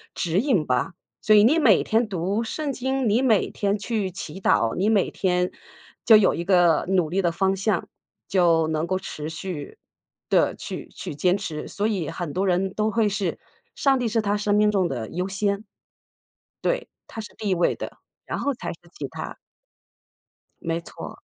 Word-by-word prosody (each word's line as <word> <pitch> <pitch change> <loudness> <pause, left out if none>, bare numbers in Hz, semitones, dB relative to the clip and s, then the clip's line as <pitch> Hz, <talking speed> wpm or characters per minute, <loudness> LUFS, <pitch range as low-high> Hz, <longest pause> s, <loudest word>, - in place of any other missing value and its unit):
指 175 +2 0
引 230 - +2
吧。 125 +5 0 0.3
所 215 - +5
以 205 - +7
你 290 +9 +5
每 225 - +5
天 225 +1 +1
读 195 +4 -1
圣 295 +4 -3
经， 265 -2 0
你 220 +5 +3
每 225 -7 +3
天 200 0 0
去 205 -2 -2
祈 190 +1 -7
祷， 115 -10 +2
你 195 - +1
每 210 -4 +2
天 180 -1 0 0.5
就 225 - +8
有 205 -3 +4
一 170 - -3
个 175 -4 +4
努 180 -5 +2
力 190 +4 +1
的 175 -2 +1
方 190 +2 +2
向， 195 -2 0 0.4
就 170 -4 +3
能 160 +1 -1
够 185 +1 0
持 155 -5 -6
续 160 -2 -6 0.5
地 - - +3
去 - - -7
去 - - -6
坚 180 +6 +2
持。 165 -6 -5
所 205 +1 -1
以 190 -8 -1
很 170 -5 -5
多 195 +2 0
人 190 +1 +1
都 215 +1 0
会 225 -1 +2
是， 200 -4 -2 0.4
上 270 -2 +3
帝 245 - 0
是 225 0 +1
他 205 0 0
生 205 0 +1
命 210 0 +4
中 190 -4 +2
的 120 -7 -4
优 180 +2 -2
先。 200 +1 -1 1.0
对， - - 0 0.2
他 225 - -7
是 215 - -11
第 210 - -3
一 - - +3
位 175 0 +2
的， - - -7 0.3
然 - - -3
后 280 - 0
才 - - -5
是 165 - -17
其 - - -5
他。 - - -7 1.2
没 165 0 -1
错。 - - -9
195 Hz, 205 characters per minute, -24 LUFS, 175-215 Hz, 1.2 s, 就